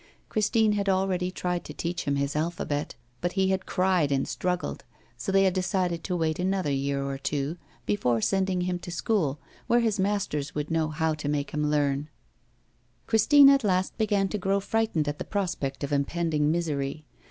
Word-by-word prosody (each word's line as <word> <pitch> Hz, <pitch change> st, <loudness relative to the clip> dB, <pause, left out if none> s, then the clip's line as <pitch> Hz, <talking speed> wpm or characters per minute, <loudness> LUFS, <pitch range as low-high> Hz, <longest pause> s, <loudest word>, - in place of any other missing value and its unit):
Christine 215 Hz, 0 st, +2 dB
had 200 Hz, -1 st, 0 dB
already 185 Hz, -1 st, +1 dB
tried 180 Hz, -1 st, -2 dB
to -, -, -8 dB
teach 175 Hz, +1 st, -3 dB
him 140 Hz, -, +1 dB
his 140 Hz, +1 st, -1 dB
alphabet, 150 Hz, -2 st, -2 dB, 0.3 s
but 175 Hz, 0 st, -1 dB
he 190 Hz, -1 st, +2 dB
had 190 Hz, -1 st, -1 dB
cried 180 Hz, -6 st, +2 dB
and 135 Hz, -1 st, +1 dB
struggled, 180 Hz, 0 st, -2 dB, 0.3 s
so 120 Hz, +8 st, -3 dB
they 195 Hz, 0 st, +5 dB
had 190 Hz, -2 st, +3 dB
decided 180 Hz, -2 st, -1 dB
to 180 Hz, -, -2 dB
wait 160 Hz, -2 st, 0 dB
another 185 Hz, -4 st, 0 dB
year 140 Hz, 0 st, -1 dB
or 135 Hz, 0 st, -4 dB
two 145 Hz, +3 st, -2 dB, 0.3 s
before 125 Hz, -, +1 dB
sending 190 Hz, -, +1 dB
him 180 Hz, 0 st, -1 dB
to 175 Hz, -, -9 dB
school, 170 Hz, -5 st, 0 dB, 0.3 s
where 240 Hz, +1 st, +4 dB
his 220 Hz, -4 st, 0 dB
masters 190 Hz, -8 st, -1 dB
would 150 Hz, +2 st, -3 dB
know 160 Hz, -1 st, +1 dB
how 160 Hz, +1 st, 0 dB
to 150 Hz, -1 st, -4 dB
make 145 Hz, -1 st, -1 dB
him 150 Hz, 0 st, 0 dB
learn. 145 Hz, 0 st, 0 dB, 1.0 s
Christine 275 Hz, +6 st, +6 dB
at 275 Hz, -2 st, +3 dB
last 185 Hz, -2 st, +1 dB
began 205 Hz, -2 st, +2 dB
to 210 Hz, -, -3 dB
grow 195 Hz, +1 st, +1 dB
frightened 210 Hz, -7 st, 0 dB
at 145 Hz, 0 st, -3 dB
the -, -, -2 dB
prospect 160 Hz, -9 st, -3 dB
of 140 Hz, -, -2 dB
impending 150 Hz, +1 st, +1 dB
misery. 155 Hz, -3 st, -2 dB
175 Hz, 185 wpm, -27 LUFS, 145-195 Hz, 1.0 s, Christine